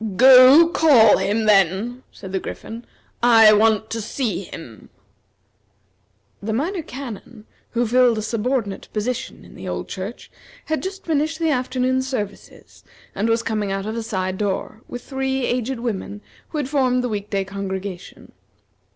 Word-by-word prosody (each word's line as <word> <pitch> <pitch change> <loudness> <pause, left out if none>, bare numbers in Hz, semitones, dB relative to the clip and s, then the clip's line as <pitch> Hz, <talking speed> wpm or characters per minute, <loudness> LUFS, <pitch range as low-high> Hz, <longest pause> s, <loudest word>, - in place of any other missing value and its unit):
"Go, 260 - +8
call 270 -11 +5
him, 205 +4 0
then!" 205 +4 +2
said 190 -2 -10
the 190 - -1
Griffin; 230 +5 -8 0.4
"I 225 -3 +7
want 220 0 +2
to 225 - -3
see 220 -2 -3
him." 120 -12 -11 1.5
The 220 +2 -3
Minor 335 - -2
Canon, 245 -5 -9 0.3
who 240 +1 +1
filled 245 0 +3
a 215 - -3
subordinate 230 -2 -2
position 225 +3 -4
in - - -15
the - - -9
old - - -4
church, 195 +5 -7 0.3
had 315 0 -2
just 385 +1 -7
finished 310 0 0
the 325 -1 0
afternoon 255 0 0
services, 250 -7 -7 0.3
and 215 +3 -1
was 230 0 +1
coming 215 -3 -2
out 195 0 -3
of 215 +1 -4
a 230 - -3
side 190 -4 -3
door, 210 +2 -3
with 245 - -8
three 265 -1 -2
aged 245 +1 -2
women 205 -3 -4 0.3
who 315 - -5
had 290 -3 -2
formed 255 -3 +1
the - - 0
week 205 -1 -4
day 195 -1 -1
congregation. 195 -1 -7
230 Hz, 155 wpm, -21 LUFS, 205-260 Hz, 1.5 s, Go